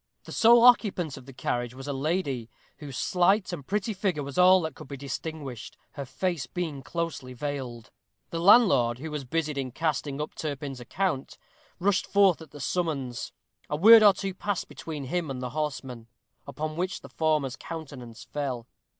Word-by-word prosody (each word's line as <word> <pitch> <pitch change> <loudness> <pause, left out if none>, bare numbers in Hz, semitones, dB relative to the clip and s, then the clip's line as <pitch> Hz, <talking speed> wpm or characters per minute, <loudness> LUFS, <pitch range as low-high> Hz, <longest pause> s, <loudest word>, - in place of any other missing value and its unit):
The - - -11
sole 235 +1 +6
occupant 200 - +4
of 130 - -12
the - - -9
carriage 120 -1 -2
was 135 +1 -9
a 145 - -2
lady, 140 -5 -2 0.3
whose 140 -4 -8
slight 185 +2 +2
and 145 -6 -7
pretty 210 +2 -1
figure 185 -7 -1
was 140 0 -7
all 185 +1 +7
that 160 -3 -4
could - - -12
be 140 0 -7
distinguished, 140 -2 -6
her 140 -2 -6
face 155 +3 -2
being 160 -6 -4
closely 145 -4 -4
veiled. 125 -4 -5 0.4
The 165 - -2
landlord, 165 - +5
who 155 +4 -7
was 150 -3 -4
busied 150 +1 -1
in 130 -1 -3
casting 145 -1 -2
up 150 - -4
Turpin's 145 -3 -5
account, 135 +3 -2 0.4
rushed 195 +1 +1
forth 195 -5 +4
at 160 - -11
the 145 - -12
summons. 140 -4 -2 0.4
A 150 - 0
word 220 +8 +9
or 205 -2 +8
two 195 0 -4
passed 200 0 -3
between 155 -3 -7
him 165 +3 -2
and 130 -2 -4
the 125 -1 -4
horsemen, 135 -5 -4 0.4
upon 155 +2 -4
which 180 +2 -2
the - - -12
former's 155 -5 0
countenance 140 -9 -8
fell. 130 -5 -4
150 Hz, 175 wpm, -27 LUFS, 135-180 Hz, 0.4 s, word